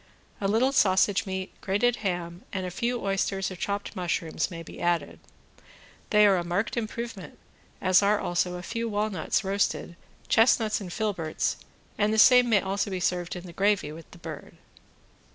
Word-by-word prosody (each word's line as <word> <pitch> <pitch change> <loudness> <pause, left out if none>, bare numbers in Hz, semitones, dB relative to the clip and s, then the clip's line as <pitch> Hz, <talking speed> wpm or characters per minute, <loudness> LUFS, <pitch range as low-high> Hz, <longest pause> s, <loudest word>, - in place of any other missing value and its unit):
A 195 - +1
little 230 +6 +3
sausage 200 -3 +3
meat, 190 0 -4
grated 220 +5 +1
ham 175 -3 -3
and 190 -2 -3
a 180 - -4
few 240 +5 -1
oysters 195 0 -1
or - - -6
chopped 200 +2 -4
mushrooms 175 -3 -2
may 165 -2 -7
be - - -11
added; 175 -1 0 0.9
they 210 0 +6
are 195 -2 +5
a 175 - -1
marked 175 +5 -1
improvement, 230 -3 -5 0.4
as 185 0 +5
are 205 +1 +3
also 180 +1 -1
a 180 - -7
few 230 +4 -3
walnuts 205 -3 -1
roasted, 195 -3 -1 0.3
chestnuts 225 -2 +3
and 180 -3 -7
filberts, 180 -6 -1 0.4
and 210 0 +3
the 220 - 0
same 250 +2 +7
may 210 -4 +4
also 195 +1 -1
be 190 -1 -3
served 175 0 -1
in 175 - -7
the 175 - -10
gravy 195 -5 +1
with 160 +1 -11
the - - -14
bird. - - -9
195 Hz, 170 wpm, -27 LUFS, 180-215 Hz, 0.9 s, same